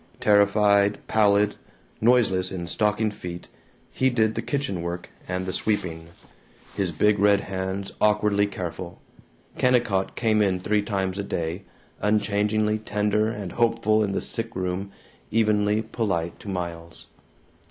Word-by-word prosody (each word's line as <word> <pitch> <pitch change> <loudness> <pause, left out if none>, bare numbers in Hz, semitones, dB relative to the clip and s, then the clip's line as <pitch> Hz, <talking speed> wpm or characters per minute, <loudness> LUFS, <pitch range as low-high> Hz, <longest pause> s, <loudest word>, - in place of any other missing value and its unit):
Terrified, 100 0 +4
pallid, 105 -1 +3 0.4
noiseless 105 -6 +3
in 90 -2 -4
stocking 105 +4 0
feet, 90 -3 -8 0.4
he 130 - +2
did 110 -3 +1
the - - -2
kitchen 140 - -2
work 85 +1 -5 0.2
and 90 0 -2
the 95 - -3
sweeping, 85 -5 -1 0.7
his 95 -3 0
big 105 +6 +2
red 100 0 +4
hands 95 +1 -4
awkwardly 105 -1 +3
careful. 85 -2 -6 0.6
Kennicott 120 -7 +2
came 110 -2 +2
in 95 -3 +1
three 105 +3 +1
times 95 -1 -2
a - - -1
day, 85 0 -3 0.3
unchangingly 105 +1 +1
tender 105 0 0
and 105 -5 -5
hopeful 115 -2 +2
in 100 -2 -1
the - - -1
sick 115 0 -4
room, 95 +2 -3 0.4
evenly 105 -1 +2
polite 95 -7 -2
to 105 - -9
Miles. 85 -2 -6
100 Hz, 130 wpm, -25 LUFS, 95-105 Hz, 0.7 s, Terrified